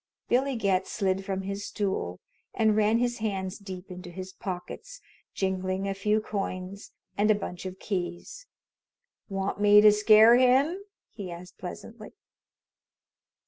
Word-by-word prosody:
Billy 265 +2 +2
Getz 195 -4 0
slid 195 -2 0
from 190 0 -3
his 200 +1 -4
stool 190 - -3 0.4
and 220 -2 +3
ran 215 +1 +3
his 240 0 -1
hands 195 -2 -3
deep 190 -2 -9
into 180 0 -8
his 185 +2 -8
pockets, 200 - -7 0.4
jingling 190 0 -1
a 195 - -1
few 210 +2 +1
coins 195 -2 -5 0.3
and 210 +1 +3
a 215 - +5
bunch 190 -2 -6
of 185 0 -8
keys. 185 - -5 0.8
"Want 195 +1 -3
me 205 0 +7
to 210 0 +8
scare 215 +2 +7
him?" 265 +8 +3 0.3
he 200 -4 -7
asked 175 +2 -11
pleasantly. 215 +4 -9
200 Hz, 140 wpm, -27 LUFS, 185-215 Hz, 0.8 s, to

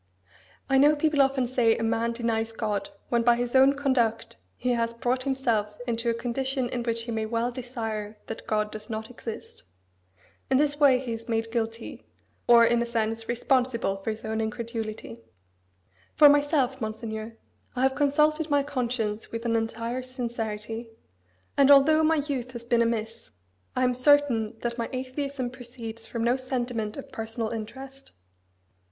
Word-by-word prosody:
I 270 -1 +4
know 295 +2 +6
people 300 -1 +2
often 270 -1 +2
say, 240 -2 +2
a - - -3
man 230 +1 0
denies 225 -1 -1
God 220 +6 -2 0.2
when 235 -1 +2
by 240 0 +5
his 240 0 -2
own 265 +1 +7
conduct 260 -5 0 0.2
he 250 - 0
has 230 -1 0
brought 250 +2 0
himself 240 -6 0
into 235 -1 -1
a 230 - +1
condition 255 +2 -2
in 245 - -2
which 230 -1 -2
he 235 - -5
may 220 -1 -2
well 230 +2 -1
desire 225 -4 -5
that 225 - -8
God 210 -1 0
does 215 +1 -9
not 220 +1 -5
exist. 230 -2 -8 0.9
In 265 - +4
this 290 +1 +1
way 275 -4 +6
he 250 -2 -4
is 225 +1 -8
made 225 0 -1
guilty, 225 -1 -4 0.4
or, 235 -1 +8
in 235 0 +3
a - - 0
sense, 225 -1 -2
responsible 240 -4 +1
for 195 +3 -5
his 215 0 -5
incredulity. 220 - -4 1.0
For 295 - +9
myself, 285 -3 +2
Monseigneur, 220 0 -5 0.4
I 250 - 0
have 265 0 +3
consulted 300 +2 +2
my 285 -1 +3
conscience 240 -6 -2
with 230 +1 -5
an 230 -1 +1
entire 230 +2 -2
sincerity; 230 -3 -5 0.7
and 280 -1 +5
although 285 +3 +7
my 320 +1 +4
youth 255 -4 -3
has 235 -1 -7
been 235 -1 +2
amiss, 230 -1 -2 0.5
I 255 - +1
am 250 0 +3
certain 255 -4 +3
that 235 0 -3
my 230 - -2
atheism 260 0 -3
proceeds 235 -3 -8
from 230 -1 -3
no 240 +2 +2
sentiment 245 -4 -3
of 275 - -9
personal 225 0 -4
interest. 265 +5 -8
235 Hz, 165 wpm, -27 LUFS, 225-260 Hz, 1.0 s, For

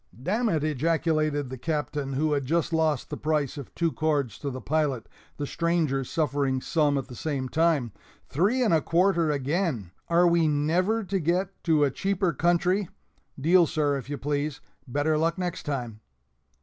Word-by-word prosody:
"D 135 +9 -3
nèt!" 215 -9 +1
ejaculated 155 -1 0
the 130 - -6
Captain, 145 -2 -2
who 150 +3 +1
had 140 -1 0
just 165 +4 0
lost 160 -4 0
the - - -3
price 150 -3 -1
of 140 -4 -8
two 170 -1 +1
cords 145 -8 -1
to 145 - -3
the 130 -1 -5
pilot 140 -5 -1 0.3
the 145 - -2
strangers 155 -5 0
suffering 140 -4 0
some 145 0 +1
at 135 - -3
the 130 - -10
same 135 0 -3
time 155 -5 +1 0.4
"three 210 - +1
and 215 - +2
a 160 - +4
quarter 170 -1 +2
again! 140 - -1 0.2
Are 175 +1 +4
we 170 -2 +3
never 175 +9 +1
to 195 0 -1
get 180 +4 -1
to 155 -3 +4
a 140 - +2
cheaper 190 +1 0
country? 175 +3 +1 0.5
(Deal, 170 +4 +5
sir, 145 -2 0
if 135 -1 -6
you 145 - -3
please; 145 +1 -2 0.3
better 145 +4 +1
luck 165 +2 +1
next 180 -3 -4
time.)" 120 -6 -3
155 Hz, 175 wpm, -26 LUFS, 140-170 Hz, 0.5 s, Deal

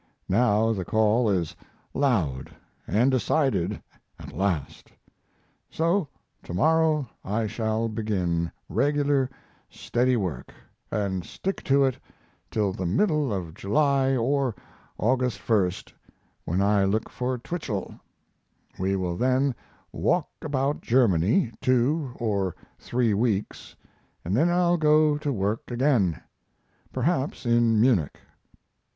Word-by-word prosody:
Now 110 +1 +3
the 95 -4 -3
call 110 +4 +2
is 90 -6 -1 0.4
loud 90 - 0 0.4
and 120 +7 +3
decided 130 - 0 0.3
at - - -10
last. 95 -6 -2 0.8
So 170 +1 +1 0.3
to 85 - -7
morrow 155 - +2 0.2
I 110 +3 -1
shall 110 +1 -1
begin 95 -7 -1 0.2
regular, 145 -2 +1 0.4
steady 125 +1 0
work, 90 - -4 0.4
and 95 -4 -1
stick 195 - -4
to 140 +1 +4
it 130 -2 -1 0.5
till 105 -3 0
the 95 -1 -3
middle 150 - +1
of 90 -5 -4
July 135 - +2
or 130 -1 0 0.4
August 125 0 +1
1st, 95 -5 0 0.5
when 90 +4 0
I 100 0 +3
look 105 +3 0
for 125 0 -3
Twichell; 120 - -5 0.8
we 95 +1 0
will 90 -2 -2
then 130 +2 +2 0.4
walk 150 - 0
about 140 -1 -1
Germany 115 - +2
two 130 +2 +1
or 100 -6 -1 0.2
three 120 -3 0
weeks, 105 -1 -2 0.5
and 90 +4 0
then 160 +8 +3
I'll 175 0 +3
go 150 -1 +4
to 145 -1 -2
work 105 -1 -2
again 120 - +1 0.7
(perhaps 135 +1 -1
in 120 -2 +3
Munich). 110 - +2
115 Hz, 115 wpm, -26 LUFS, 100-140 Hz, 0.8 s, to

